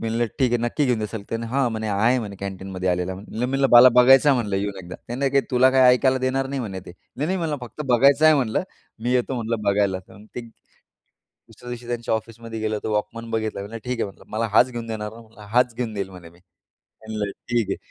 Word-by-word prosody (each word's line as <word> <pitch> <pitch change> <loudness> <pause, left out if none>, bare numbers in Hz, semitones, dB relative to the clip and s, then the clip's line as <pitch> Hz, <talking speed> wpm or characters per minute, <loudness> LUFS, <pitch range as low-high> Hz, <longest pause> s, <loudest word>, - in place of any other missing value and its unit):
मी 115 - -3
म्हटलं 115 +1 0
ठीक 130 -3 +2
आहे. 120 - +2
नक्की 145 +5 0
घेऊन 125 -3 +1
द्याल? 105 0 -5
ते 115 - -1 0.2
हां 135 0 +2
म्हणे 110 -1 -3
आहे 115 +6 +3
म्हणे 105 -4 -6
कॅन्टीनमध्ये 95 -1 -4
आलेला 90 +1 -1
म्हणलं. 105 +3 -10
मी 125 - 0
म्हटलं 135 +1 +1
मला 120 +1 +10
बघायचं 135 +3 +7
आहे 140 - +5
म्हणलं 105 -5 -1
येऊन 100 0 -3
एकदा. 90 0 -9
त्याने 135 +3 +1
तुला 130 0 +5
काही 130 -1 +4
ऐकायला 130 +1 +2
देणार 130 +1 0
नाही 140 0 -3
म्हणे 95 -6 -5
ते. 90 - -9 0.2
नाही 145 +4 -1
नाही 185 +3 0
म्हणलं 160 -4 -2
फक्त 125 +5 -7
बघायचं 140 +5 +5
आहे 155 0 +7
म्हटलं. 125 -6 0 0.4
मी 120 +2 0
येतो 125 +1 0
म्हटलं 115 -2 -3
बघायला. 100 -2 +1
तर 105 - -15
ते - - -4 0.9
दुसऱ्या 125 - -16
दिवशी 120 0 -7
त्यांच्या 120 -1 -2
ऑफिसमध्ये 115 0 -5
गेलो. 110 -1 -2
तर - - -3
वॉकमन 110 +2 -3
बघितला. 110 -2 -2
म्हणलं 105 +3 -6
ठीक 125 -1 -3
आहे. - - +1
म्हटलं - - -17
मला 115 +1 0
हाच 125 +3 +5
घेऊन 120 -1 -6
देणार 105 -2 -4
ना? 115 - -12
म्हणलं 110 -1 -18
हाच 125 -1 +3
घेऊन 120 -3 -3
देईल 100 -2 -4
म्हणे 90 -3 -12
मी. 85 +1 -22 0.7
म्हणलं 105 -2 -3 0.2
ठीक 120 -4 0
आहे. - - -2
115 Hz, 235 wpm, -23 LUFS, 105-125 Hz, 0.9 s, मला